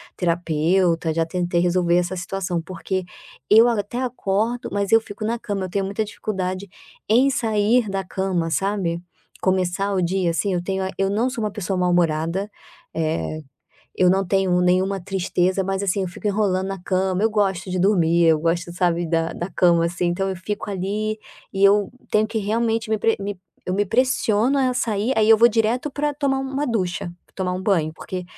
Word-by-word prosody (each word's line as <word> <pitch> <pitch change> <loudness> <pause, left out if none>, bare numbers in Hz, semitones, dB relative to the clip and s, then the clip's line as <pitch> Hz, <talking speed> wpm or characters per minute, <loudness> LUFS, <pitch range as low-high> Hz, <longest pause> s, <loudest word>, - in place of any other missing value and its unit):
terapeuta, 170 0 +1
já 165 +1 +1
tentei 175 +1 -1
resolver 175 -1 +2
essa 180 +1 0
situação, 185 -1 -3
porque 185 +2 -4 0.4
eu 225 +7 +7
até 230 +2 -2
acordo, 235 -1 -1
mas 200 -1 -1
eu 225 - +7
fico 215 -1 -9
na 230 +2 -1
cama, 200 -4 -3
eu - - -7
tenho 195 +2 -1
muita 200 +3 -2
dificuldade 200 -2 -4 0.4
em 250 +5 +4
sair 225 -1 +2
da 195 0 -2
cama, 180 -2 -2
sabe? 190 -1 -1 0.4
Começar 190 +1 0
o 190 - +1
dia 180 0 +1
assim 195 +4 -1
eu 175 -1 -1
tenho 190 +1 -2
a 190 - -2
eu 195 0 +1
não 225 +5 +1
sou 240 -4 -4
uma 210 - -1
pessoa 195 -1 -3
mal-humorada, 175 +1 +1 0.5
eh, 155 -1 -2 0.5
eu 180 - +3
não 190 +1 +2
tenho 190 -1 +2
nenhuma 185 +2 +2
tristeza, 185 0 0
mas 195 +1 -2
assim 200 0 0
eu 185 - -2
fico 175 - -8
enrolando 195 -2 +1
na 195 -1 -5
cama. 185 0 0
Eu 220 - +4
gosto 195 -3 0
de 185 - -1
dormir, 170 -3 +3
eu 160 -2 +4
gosto, 170 +1 -1
sabe, 175 -1 0
da 165 0 0
da 175 +3 -5
cama 170 -1 +3
assim 175 +1 -1
então 190 +3 0
eu 190 - -4
fico 205 +3 -5
ali, 205 +3 -2 0.3
e 195 -1 -2
eu 200 0 +5 0.2
tenho 215 0 +3
que 225 0 -3
realmente 225 +2 0
me 220 - +1
pre 225 +2 +2
me 200 -1 -4 0.3
eu 180 - -1
me 205 +2 +2
pressiono 245 +2 +2
a 260 -2 +2
sair, 220 0 0
aí 220 -1 +3
eu 225 - +8
vou 230 +2 +6
direto 230 +5 0
para 295 +2 -1
tomar 275 -2 0
uma 270 +2 -2
ducha, 185 -6 -2 0.2
tomar 185 -1 -2
um 185 +1 -4
banho 165 -6 +1
porque 180 +2 -6
195 Hz, 190 wpm, -22 LUFS, 180-215 Hz, 0.5 s, eu